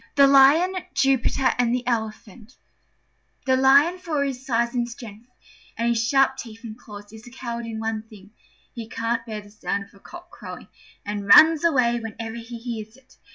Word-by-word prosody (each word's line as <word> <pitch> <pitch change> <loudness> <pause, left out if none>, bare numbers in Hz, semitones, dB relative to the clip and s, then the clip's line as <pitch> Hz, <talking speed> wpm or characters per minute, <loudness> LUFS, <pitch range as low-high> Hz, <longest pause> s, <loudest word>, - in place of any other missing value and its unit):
THE 280 -1 +6
LION, 280 +7 +5 0.2
JUPITER, 270 0 +1
AND 245 0 +2
THE 250 -1 -4
ELEPHANT 220 0 -5 0.9
The 260 -1 +3
Lion, 280 +7 +4
for 335 -3 -5
all 285 - +1
his 265 -2 -4
size 235 -2 -1
and 240 -1 -1
strength, 230 0 -12 0.5
and 235 +1 0
his 230 -1 +1
sharp 270 0 +2
teeth 225 -3 -10
and 220 -2 -8
claws, 205 -3 -13
is 220 +2 -13
a - - -10
coward 235 -2 -6
in 220 -1 -6
one 220 -1 -3
thing: 205 -1 -16 0.4
he 230 -2 -8
can't 230 0 -2
bear 215 -2 -5
the 205 0 -17
sound 205 -1 -4
of 200 - -20
a 200 - -19
cock 350 - -13
crowing, - - -10 0.4
and 205 -1 -5
runs 315 +9 +7
away 250 -7 +2
whenever 225 0 -7
he 235 +1 -8
hears 230 -1 -7
it. 265 -1 -24
235 Hz, 190 wpm, -23 LUFS, 220-265 Hz, 0.9 s, runs